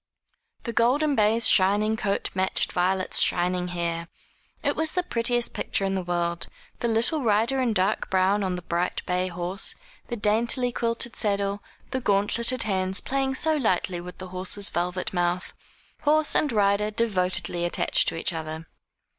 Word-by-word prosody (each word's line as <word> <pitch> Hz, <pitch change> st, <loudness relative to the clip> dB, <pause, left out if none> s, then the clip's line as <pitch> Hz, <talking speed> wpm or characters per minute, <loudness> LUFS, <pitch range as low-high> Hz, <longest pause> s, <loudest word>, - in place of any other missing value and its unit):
The 235 Hz, -, -4 dB
golden 275 Hz, +6 st, +2 dB
bay's 220 Hz, +1 st, +3 dB
shining 205 Hz, +3 st, +4 dB
coat 200 Hz, -2 st, -2 dB
matched 190 Hz, 0 st, +1 dB
Violet's 185 Hz, +1 st, +1 dB
shining 180 Hz, 0 st, +1 dB
hair. 170 Hz, -1 st, -3 dB, 0.6 s
It -, -, 0 dB
was 315 Hz, 0 st, 0 dB
the 360 Hz, -, 0 dB
prettiest 240 Hz, -5 st, 0 dB
picture 195 Hz, -, -2 dB
in 195 Hz, -, -1 dB
the 190 Hz, -, -1 dB
world, 175 Hz, -1 st, -2 dB, 0.3 s
the 235 Hz, -, 0 dB
little 235 Hz, +7 st, +1 dB
rider 230 Hz, +3 st, +2 dB
in 245 Hz, -3 st, +1 dB
dark 195 Hz, +1 st, 0 dB
brown 190 Hz, +2 st, +2 dB
on 185 Hz, -1 st, -1 dB
the 180 Hz, -, -7 dB
bright 175 Hz, +1 st, -2 dB
bay 180 Hz, 0 st, 0 dB
horse, 180 Hz, +3 st, -1 dB, 0.3 s
the 240 Hz, -, -3 dB
daintily 235 Hz, +4 st, +2 dB
quilted 230 Hz, 0 st, -1 dB
saddle, 200 Hz, -1 st, -1 dB, 0.3 s
the 260 Hz, -1 st, -2 dB
gauntleted 230 Hz, +4 st, +1 dB
hands 190 Hz, -1 st, 0 dB
playing 270 Hz, 0 st, -1 dB
so 315 Hz, +3 st, +4 dB
lightly 185 Hz, -7 st, 0 dB
with 180 Hz, +1 st, -10 dB
the 185 Hz, -1 st, -8 dB
horse's 185 Hz, +2 st, -3 dB
velvet 180 Hz, +2 st, -2 dB
mouth 175 Hz, 0 st, -1 dB, 0.5 s
horse 305 Hz, +1 st, +3 dB
and 295 Hz, -, +2 dB
rider 205 Hz, -1 st, +2 dB
devotedly 185 Hz, -5 st, -1 dB
attached 175 Hz, -, +1 dB
to -, -, 0 dB
each 165 Hz, +2 st, -1 dB
other. 160 Hz, 0 st, -6 dB
200 Hz, 160 wpm, -25 LUFS, 180-235 Hz, 0.6 s, shining